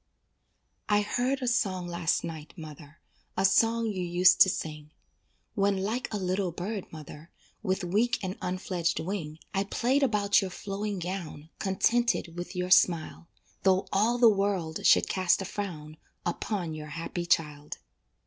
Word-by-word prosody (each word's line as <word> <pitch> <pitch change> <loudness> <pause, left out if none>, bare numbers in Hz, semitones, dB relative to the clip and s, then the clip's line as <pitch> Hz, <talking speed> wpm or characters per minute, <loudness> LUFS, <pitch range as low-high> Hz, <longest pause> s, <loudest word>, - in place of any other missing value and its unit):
I 205 0 +4
heard 255 +5 -1
a - - -1
song 190 -7 0
last 170 -2 0
night, 160 -2 -7
mother, 155 -1 -11 0.4
A 190 - +3
song 225 +4 +3
you 205 -4 -2
used 180 +1 +4
to 190 - +9
sing, 150 -4 -5 0.6
When 200 -2 +1
like 215 +6 -2
a 215 - -1
little 185 -1 -1
bird, 190 +4 -5
mother, 155 0 -10 0.3
With 190 -3 -1
weak 210 +7 +1
and 190 0 -3
unfledged 180 -2 -1
wing, 165 -4 -4 0.2
I 195 0 +1
played 250 +7 +1
about 210 -6 +3
your 190 - -3
flowing 200 +2 -4
gown 170 -4 -6
Contented 195 -2 +1
with 175 +2 -6
your 180 0 -2
smile, 170 -2 +3 0.3
Though 190 0 +2
all 220 +5 +3
the 240 -1 +6
world 195 -6 +1
should - - +5
cast 185 -2 +2
a 195 - -4
frown 165 -6 -6 0.3
Upon 175 -1 -2
your 155 -1 -7
happy 165 +3 -5
child. 150 -3 0
185 Hz, 150 wpm, -28 LUFS, 170-205 Hz, 0.6 s, to